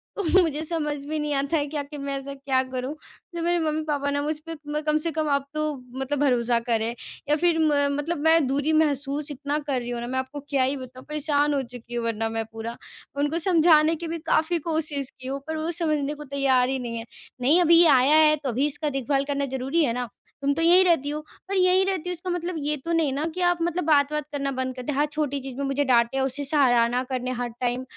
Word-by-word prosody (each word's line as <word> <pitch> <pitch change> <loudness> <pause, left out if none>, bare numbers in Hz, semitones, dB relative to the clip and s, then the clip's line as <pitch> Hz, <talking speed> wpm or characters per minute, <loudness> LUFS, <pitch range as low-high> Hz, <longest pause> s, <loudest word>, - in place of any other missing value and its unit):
तो 410 - -2 0.2
मुझे 310 -2 -2
समझ 310 -2 -2
में 300 +2 -4
नहीं 300 -1 -1
आता 280 +3 0
है 290 - 0
क्या 295 0 -3
कि 290 +1 -10
मैं 280 0 -3
ऐसा 275 +1 -6
क्या 270 -1 0
करूँ 255 +2 -3 0.4
जो 340 - -3
मेरे 345 +1 +2
मम्मी-पापा 305 -3 -1
ना 285 0 0
मुझ 305 +2 -1
पे - - -3
म 300 +1 -1
कम 305 0 +3
से 325 +2 -2
कम 310 0 -1
अब 280 -1 0
तो 305 0 -1 0.4
मतलब 270 +1 -2
भरोसा 245 -4 +2
करें। 230 -1 -1 0.4
या 300 - +4
फिर 335 +1 +2
म 310 -1 +3 0.2
मतलब 330 +4 -2
मैं 320 -1 +5
दूरी 285 +4 0
महसूस 295 -1 0
इतना 285 +1 -2
कर 270 -3 0
रही 240 0 -6
हूँ 240 -1 -3
ना 240 - -4
मैं 260 +1 -1
आपको 260 +3 -5
क्या 275 -3 +2
ही 265 +2 0
बताऊँ 255 0 -10
परेशान 295 -1 +1
हो 280 - +1
चुकी 240 -1 -9
हूँ 235 -1 -2
वरना 225 -1 -1
मैं 225 0 -3
पूरा। 225 +1 -6 0.4
उनको 290 +3 0
समझाने 325 -2 +4
की 335 +1 -6
भी 330 +1 -3 0.2
काफ़ी 335 +2 +2
कोशिश 300 -4 -2
की 255 - -8
हूँ 275 +1 -3
पर 315 0 -3
वो 315 +2 -2
समझने 305 -4 -1
को 300 0 -9
तैयार 270 -3 +2
ही 265 0 -1
नहीं 235 -2 -4
है। 225 - -6 0.4
नहीं 300 +8 +4
अभी 335 0 +6
ये 345 - +7
आया 275 0 +5
है 305 - +4
तो 285 -3 -4
अभी 255 +4 +1
इसका 295 +1 -3
देखभाल 275 0 0
करना 280 0 -1
ज़रूरी 270 +6 +1
है 235 - 0
ना? 245 -1 -3 0.3
तुम 280 0 +2
तो 325 - -2
यहीं 350 +3 +7
रहती 325 -5 +2
हो, 300 +1 -3 0.3
पर 395 - -1
यहीं 370 0 +4
रहती 375 -3 -2
हो - - -1
इसका 360 +1 -6
मतलब 355 0 -2
ये 295 +1 -1
तो 335 - -2
नहीं 320 -4 +2
ना 285 +3 -2
कि 365 - -2
आप 350 0 +3
मतलब 345 +1 0
बात-वात 300 -1 +2
करना 280 -1 -2
बंद 260 -1 -3
करते 255 +3 -4
हैं। 280 - -2
हर 295 - +4
छोटी 295 -2 -1
चीज़ 265 -1 -7
में 280 - -2
मुझे 275 +1 0
डाँटे, 240 0 +3
उसे 265 +2 -1
सराहना 245 -4 +3
करने 255 -1 -3
हर 245 -1 -2
टाइम 245 +1 -1
285 Hz, 245 wpm, -25 LUFS, 260-315 Hz, 0.4 s, ये